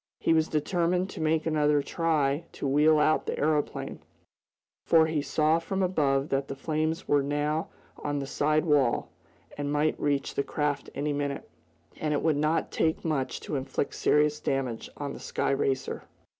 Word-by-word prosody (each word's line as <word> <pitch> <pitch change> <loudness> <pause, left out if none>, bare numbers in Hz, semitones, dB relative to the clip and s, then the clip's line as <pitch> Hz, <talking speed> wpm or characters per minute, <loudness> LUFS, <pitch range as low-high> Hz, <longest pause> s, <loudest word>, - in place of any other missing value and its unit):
He - - +2
was 160 0 +3
determined 175 +4 0
to - - -7
make 155 0 +1
another 150 -2 +2
try 155 -2 0
to - - -3
wheel 150 +3 +4
out 155 +1 +2
the - - -2
aeroplane, 150 0 -1 0.8
for 160 -1 +5
he 160 -2 0
saw 155 +3 +2
from 190 +3 -2
above 145 -6 +1
that 135 0 0
the 135 - -5
flames 155 +3 -2
were 145 -1 +3
now 150 +3 -1 0.3
on 145 0 -3
the 140 - -2
side 150 +3 +1
wall, 145 -6 +2 0.5
and 145 0 -2
might 150 +1 +1
reach 145 -1 0
the - - 0
craft 145 0 -2
any 145 +1 -1
minute. 140 -1 -3 0.5
And 150 -1 -1
it - - -1
would 160 -3 +2
not 155 +2 0
take 160 +1 0
much 145 -5 -1
to - - -4
inflict 135 +1 -2
serious 150 0 +2
damage 130 -6 -2
on 140 -1 -4
the - - -9
sky - - -1
racer. 135 -1 -1
150 Hz, 170 wpm, -28 LUFS, 140-155 Hz, 0.8 s, for